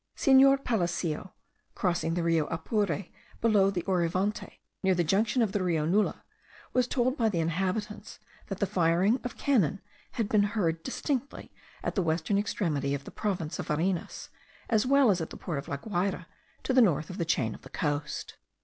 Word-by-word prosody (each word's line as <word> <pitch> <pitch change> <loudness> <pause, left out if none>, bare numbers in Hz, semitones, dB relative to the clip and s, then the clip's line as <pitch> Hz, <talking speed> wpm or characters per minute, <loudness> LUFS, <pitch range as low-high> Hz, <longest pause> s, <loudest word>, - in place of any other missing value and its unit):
Senor 275 0 +6
Palacio, 180 - -2 0.4
crossing 170 -3 0
the 175 - 0
Rio 165 -2 +2
Apure 175 +1 -1 0.3
below 210 -4 +4
the 180 -3 -2
Orivante, 185 +2 -1 0.2
near 190 -1 +3
the 175 - +2
junction 215 +8 +2
of 210 - 0
the 205 - -1
Rio 165 -4 +1
Nula, 200 +6 +1 0.5
was 250 -1 +2
told 255 +1 +1
by 230 -6 +2
the 180 -5 -1
inhabitants, 190 +6 -2 0.3
that 195 - -4
the 200 - +1
firing 185 +4 +2
of 245 - -6
cannon 200 - +2 0.3
had 230 -4 -1
been 210 -1 +3 0.2
heard 165 -5 0
distinctly 275 - -3 0.3
at - - -1
the 195 - +1
western 165 +4 0
extremity 145 -9 -1
of 140 - -6
the - - -10
province 185 -7 -3
of - - -4
Varinas, 170 +3 -2 0.4
as 220 +2 +3
well 275 -4 +5
as 180 -3 0
at 160 - -4
the - - -9
port 160 -6 -4
of 140 - -9
La 140 - -3
Guayra 180 +1 -2 0.4
to 265 - 0
the 255 - +6
north 165 - +2
of 185 - -8
the - - +1
chain 125 -9 0
of - - -12
the - - -13
coast. 145 -1 -3
190 Hz, 185 wpm, -29 LUFS, 165-215 Hz, 0.5 s, Senor